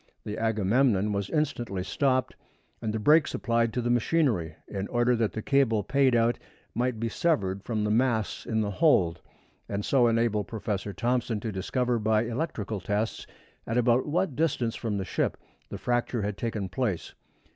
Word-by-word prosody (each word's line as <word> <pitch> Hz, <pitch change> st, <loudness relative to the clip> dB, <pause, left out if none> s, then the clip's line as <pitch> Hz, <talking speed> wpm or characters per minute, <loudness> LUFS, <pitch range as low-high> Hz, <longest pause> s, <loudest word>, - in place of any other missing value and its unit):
The 105 Hz, -, -4 dB
Agamemnon 110 Hz, -1 st, +2 dB
was 100 Hz, -1 st, -2 dB
instantly 120 Hz, -, -1 dB
stopped 130 Hz, +4 st, 0 dB, 0.5 s
and 110 Hz, -2 st, -2 dB
the 110 Hz, -, -2 dB
brakes 150 Hz, +8 st, +4 dB
applied 115 Hz, -1 st, +1 dB
to 125 Hz, -, -1 dB
the 120 Hz, -, +1 dB
machinery, 120 Hz, -, +1 dB
in 100 Hz, -1 st, -4 dB
order 120 Hz, +1 st, +2 dB
that 115 Hz, -5 st, 0 dB
the 110 Hz, -, -4 dB
cable 125 Hz, -7 st, +2 dB
paid 135 Hz, -1 st, +3 dB
out 115 Hz, +1 st, +2 dB, 0.3 s
might 125 Hz, -2 st, -1 dB
be 115 Hz, -, -1 dB
severed 100 Hz, -, 0 dB
from 110 Hz, -2 st, -2 dB
the 105 Hz, -, 0 dB
mass 115 Hz, -2 st, 0 dB
in 110 Hz, -1 st, +1 dB
the 105 Hz, -1 st, -1 dB
hold, 95 Hz, -, +3 dB, 0.5 s
and 100 Hz, 0 st, -2 dB
so 125 Hz, -3 st, +4 dB
enable 115 Hz, -2 st, +1 dB
Professor 105 Hz, -2 st, -4 dB
Thomson 120 Hz, +2 st, -1 dB
to 110 Hz, -, -3 dB
discover 120 Hz, +5 st, -1 dB
by 110 Hz, 0 st, +2 dB
electrical 115 Hz, -4 st, -3 dB
tests 105 Hz, +4 st, -2 dB, 0.4 s
at 115 Hz, -, -1 dB
about 125 Hz, +2 st, +3 dB
what 165 Hz, -1 st, 0 dB
distance 130 Hz, -7 st, 0 dB
from 110 Hz, -4 st, -2 dB
the 95 Hz, -, -3 dB
ship -, -, -1 dB, 0.3 s
the -, -, -5 dB
fracture 120 Hz, -2 st, -1 dB
had 105 Hz, 0 st, -2 dB
taken 110 Hz, -3 st, -3 dB
place. 100 Hz, -2 st, -2 dB
115 Hz, 170 wpm, -27 LUFS, 105-125 Hz, 0.5 s, brakes